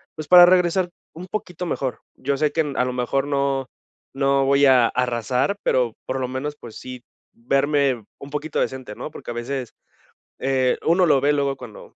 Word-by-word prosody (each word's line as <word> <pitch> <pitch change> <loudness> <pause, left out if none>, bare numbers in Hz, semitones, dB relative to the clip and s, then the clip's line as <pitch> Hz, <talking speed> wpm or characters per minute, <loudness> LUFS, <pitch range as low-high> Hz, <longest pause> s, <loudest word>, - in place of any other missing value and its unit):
pues, 155 - -7
para 180 -1 +9
regresar 180 0 +3 0.2
un 170 +3 -9
poquito 180 -3 -5
mejor. 135 -6 -3
Yo 140 +1 -2
sé 150 +1 +1
que 160 - +1
n 145 -3 -4
a 125 - +2
lo 125 - -3
mejor 125 +2 -1
no 140 -2 0 0.5
no 135 0 +2
voy 140 +1 +4
a 125 -3 +5
arrasar, 125 - 0
pero 120 -3 +1
por 130 +1 -3
lo 130 - -2
menos, 130 +4 -4
pues 115 -5 -11
sí, 125 -1 -9 0.3
verme 135 0 +1 0.2
un 140 - -10
poquito 150 +1 -3
decente, 130 -5 -3
¿no?, - - -6
porque 120 - -8
a - - -4
veces, 125 +1 -4 0.7
eh, 130 -1 +1
uno 175 +3 +4
lo 145 -5 +4
ve 145 +2 +3
luego 140 -1 0
cuando 120 -4 -12
135 Hz, 190 wpm, -22 LUFS, 125-150 Hz, 0.7 s, para